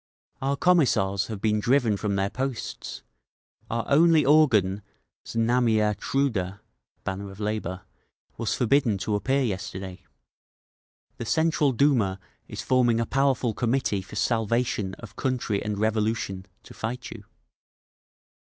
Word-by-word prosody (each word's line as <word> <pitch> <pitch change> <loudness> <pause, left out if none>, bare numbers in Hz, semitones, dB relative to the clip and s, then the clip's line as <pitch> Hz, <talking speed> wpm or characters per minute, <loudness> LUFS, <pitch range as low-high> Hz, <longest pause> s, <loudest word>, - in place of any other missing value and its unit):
Our 140 +1 0
Commissars 130 - +2
have 110 -3 -5
been 105 -1 +2
driven 120 -1 +2
from 100 0 -2
their 100 0 0
posts. 130 -1 -5 0.7
Our 115 0 -2
only 160 +2 +5
organ, 110 -11 +4 0.5
Znamia 115 -2 +2
Truda 100 -10 -1 0.4
(Banner 100 +1 -4
of 95 +1 -12
Labour), 105 -4 -3 0.5
was 115 -1 -1
forbidden 125 -3 +2
to 105 +3 -3
appear 135 +7 +1
yesterday…. 95 -3 -4 1.2
"The 115 - -5
Central 155 +1 +2
Duma 120 -8 +2 0.3
is - - -6
forming 120 -3 +3
a 115 - +1
powerful 130 -2 +1
Committee 120 -4 0
for 95 - -12
Salvation 115 -3 0
of 110 -2 -12
Country 125 -6 -1
and 105 0 -3
Revolution, 110 -3 -1 0.2
to - - -13
fight 125 +3 -5
you. 110 -3 -10
115 Hz, 125 wpm, -26 LUFS, 100-130 Hz, 1.2 s, only